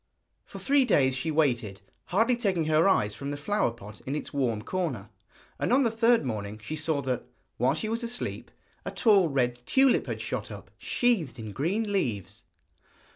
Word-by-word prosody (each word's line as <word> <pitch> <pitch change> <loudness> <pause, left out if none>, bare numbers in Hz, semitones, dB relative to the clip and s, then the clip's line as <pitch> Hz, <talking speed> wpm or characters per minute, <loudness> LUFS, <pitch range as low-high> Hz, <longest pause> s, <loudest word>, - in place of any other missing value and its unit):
For - - -10
three 280 0 +3
days 135 - +3
she 135 +5 -2
waited, 120 -10 0 0.3
hardly 225 +7 +2
taking 195 -8 0
her 155 +4 +4
eyes 105 - +2
from 140 +6 -6
the 145 - -3
flower 205 +2 0
pot 105 -2 -11
in 135 - -1
its 150 - -5
warm 120 -6 0
corner, 130 - -3 0.5
and - - 0
on 270 +2 +5
the 230 - +2
third 230 - +3
morning 105 -3 -4
she 130 +9 -5
saw 155 -2 -1
that, 130 -2 -2 0.3
while 130 +4 +2
she 215 - -3
was 230 +2 -2
asleep, 235 +1 -4 0.3
a - - -4
tall 200 -7 +4
red 125 -3 0
tulip 270 -1 +4
had - - -3
shot - - -4
up, - - -10
sheathed 205 - 0
in 110 -2 -7
green 200 - -1
leaves. 115 - -2
155 Hz, 180 wpm, -28 LUFS, -, 0.5 s, on